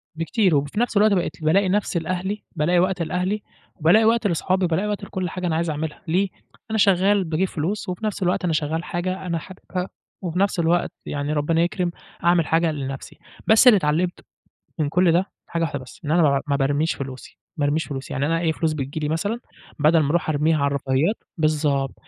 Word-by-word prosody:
بكتير 165 +2 +1
وب 140 +1 +1
في 175 - -4
نفس 235 -3 +1
الوقت 210 0 +5
بقيت 170 -4 -1
بالاقي 185 +5 +3
نَفْسي 195 -3 0
لأهلي 185 +5 -3
بالاقي 175 +3 +2
وقت 185 0 +1
لأهلي، 180 +5 -1 0.3
وبالاقي 190 +7 +4
وقت 230 -1 +3
لأصحابي، 185 +1 +1
وبالاقي 180 +5 0
وقت 205 -1 -3
لكل 185 -1 -3
حاجة 180 +1 -3
أنا 160 - 0
عايز 165 0 0
أعملها، 150 +1 -4
ليه؟ 190 +4 +1 0.4
أنا 220 - +1
شغال 195 0 +4
باجيب 170 +3 0
فلوس، 180 +6 -3
وفي 180 +4 -4
نفس 205 -2 -2
الوقت 180 +1 +1
أنا 170 - +1
شغال 155 +2 -1
حاجة 185 +2 -3
أنا 170 -2 -1
حاببها، 185 +1 -6 0.3
وفي 180 -1 -3
نفس 200 -2 +1
الوقت 170 +1 +2
يعني 145 +1 -2
ربنا 160 +3 +1
يكرم 175 0 0 0.3
أعمل 170 -2 +3
حاجة 165 0 +2
لنَفْسي 135 -2 -6 0.3
بس 220 +3 +6
اللي 230 -4 +9
اتعلمت 175 +2 0 0.6
من 150 -2 +1
كل 175 +2 +3
ده 180 +4 +1 0.2
حاجة 170 - -2
واحدة 145 -3 -2
بس، 130 - -13
إن 150 - -1
أنا 170 +1 +4
ما 150 - +5
بع 140 0 +2
ما 140 - +1
بارميش 145 +3 +1
فلوسي، 130 -2 -8 0.2
ما 145 - +1
أرميش 155 +2 +1
فلوسي. 135 -2 -6
يعني 135 - 0
أنا 165 +2 +1
أي 165 -1 +1
فلوس 155 -1 0
بتيجي 140 +1 -4
لي 150 -1 -2
مثلًا 200 +9 -1 0.4
بدل 155 +3 +5
ما 145 -2 +1
أروح 170 0 +1
أرميها 155 +1 +2
على 140 - +2
الرفاهيات 140 - +1 0.2
بالضبط، 150 -3 +1
170 Hz, 210 wpm, -23 LUFS, 150-185 Hz, 0.6 s, اللي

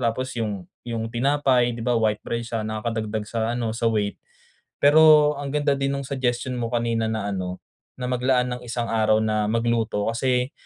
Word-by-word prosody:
Tapos 130 +3 -4
yung 100 -5 -3 0.2
yung 115 -1 -4
tinapay 130 -1 +2
'di 115 - -6
ba 125 - +2
white 110 -2 0
bread 115 0 -2
siya, 115 -2 -4
nakakadagdag 110 0 -3
sa 115 0 -1
ano 115 -2 -2
sa 115 - 0
weight. 105 -2 0 0.6
Pero 150 0 +6
ang 140 - -4
ganda 145 0 +1
din 135 0 -1
nung 135 - -5
suggestion 130 -1 -1
mo 115 -1 -2
kanina 115 -2 0
na 105 -2 -2
ano, 90 -1 -4 0.4
na 125 - -5
maglaan 125 0 +1
ng - - -16
isang 120 0 -2
araw 110 -1 +3
na 105 -1 0
magluto, 115 -2 0
kasi 125 +3 0
115 Hz, 180 wpm, -24 LUFS, 110-130 Hz, 0.6 s, Pero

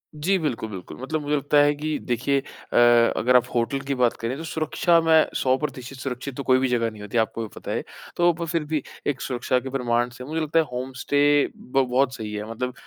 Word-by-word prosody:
जी, 185 +6 +1
बिल्कुल, 125 -8 -2
बिल्कुल। 95 -4 -8
मतलब 155 +4 -2
मुझे 145 0 0
लगता 145 +1 +1
है 145 0 +3
कि 150 +1 -2
देखिए 130 +3 +1
अ, 135 - -7 0.4
अगर 125 +3 +3
आप 125 -1 +6
होटल 120 +3 0
की 140 0 -2
बात 125 -2 +2
करें 115 +3 -2
तो 165 - -6
सुरक्षा 165 +2 +2
मैं 160 -1 +5 0.2
100% 130 -1 -1
सुरक्षित 130 0 -5
तो 140 - -3
कोई 130 -1 +4
भी 130 - +1
जगह 115 -2 +1
नहीं 110 -1 -12
होती, 105 +3 -4
आपको 115 +1 0
भी 110 - -3
पता - - -6
है। - - -2 0.3
तो 175 0 +5
पर 170 +1 -4
फिर 165 -1 -1
भी 150 -2 -2 0.2
एक 140 -3 -1
सुरक्षा 125 0 0
के 130 - -7
प्रमाण 120 -2 0
से 125 - -8
मुझे 155 +5 -3
लगता 155 +1 +2
है 160 - +2
होम 125 +1 -4
स्टे 145 0 +2 0.4
ब 135 +1 0
बहुत 130 +1 +2
सही 110 -2 -6
है 105 +1 -5
मतलब 125 +2 -3
130 Hz, 235 wpm, -24 LUFS, 125-150 Hz, 0.4 s, आप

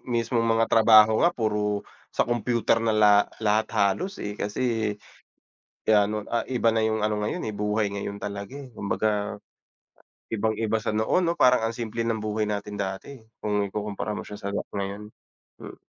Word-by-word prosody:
Mismong 115 -1 0
mga 115 0 +3
trabaho 110 -1 +6
nga 175 - +1
puro 105 -2 -1 0.3
sa - - +3
computer 120 -1 +1
na 115 -1 +1
la 105 -1 +6 0.3
lahat 110 +1 +2
halos, 105 - 0
eh, 105 0 -5
kasi, 110 0 -1 0.9
gaya 105 -2 +4
no'n 105 0 -3
ah, 120 - -1
iba 120 -3 +2
na 115 - +1
yung 110 -1 -1
ano 105 0 0
ngayon, 105 - -2
eh, 110 - -3
buhay 105 0 0
ngayon 100 0 -4
talaga. 100 +4 -5
eh 140 -3 -9
Kumbaga 105 0 -1 0.9
ibang 110 0 0
iba 110 0 +1
sa 110 -1 -2
noon 110 +12 +1
'no 170 - +2
parang 125 -2 +5
ang 115 - 0
simple 115 0 -4
ng 115 -1 -1
buhay 105 0 -1
natin 105 0 -4
dati 95 +7 -5 0.2
kung 105 -1 0
ikukumpara 105 +1 -4
mo - - -4
siya 105 - -7
sa 100 0 -5
nga - - -1 0.2
ngayon, 100 +1 -4 0.5
hmm. - - -11
110 Hz, 175 wpm, -26 LUFS, 105-115 Hz, 0.9 s, trabaho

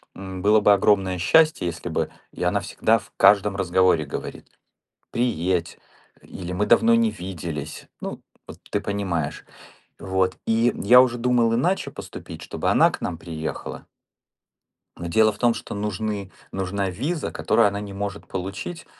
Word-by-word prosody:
м, 95 -1 -7
было 105 +2 +4
бы 105 0 +6
огромное 95 -2 +2
счастье, 155 - +4
если 85 -1 -5
бы - - -1 0.2
И - - -6
она - - +2
всегда 115 +1 +1
в 100 - -18
каждом 100 -1 +5
разговоре 90 -4 +2
говорит: - - -7 0.6
"Приедь" 90 -8 -1 0.4
или 90 -1 -7
"Мы 100 +3 0
давно 230 +1 +5
не 230 -1 +3
виделись". 85 - -6
Ну, - - -6 0.2
вот - - -11
ты 105 - 0
понимаешь. 95 -8 -3 0.5
Вот, 95 -1 0
и 115 +2 +3
я 125 +6 +7
уже 120 -1 0
думал 120 -2 +2
иначе 175 +11 0
поступить, - - -9
чтобы - - -2
она - - +5
к - - -7
нам 85 - -3
приехала. 80 -2 -6 1.1
Но 85 - -5
дело 110 +5 +4
в 100 - -13
том, 120 -1 +3
что - - -7
нужны 105 -1 -3 0.2
нужна 95 +1 -2
виза, 140 - -3
которую 115 - +3
она 100 0 -2
не 100 -1 -7
может 100 0 -5
получить. 95 - -5
100 Hz, 155 wpm, -23 LUFS, 90-115 Hz, 1.1 s, я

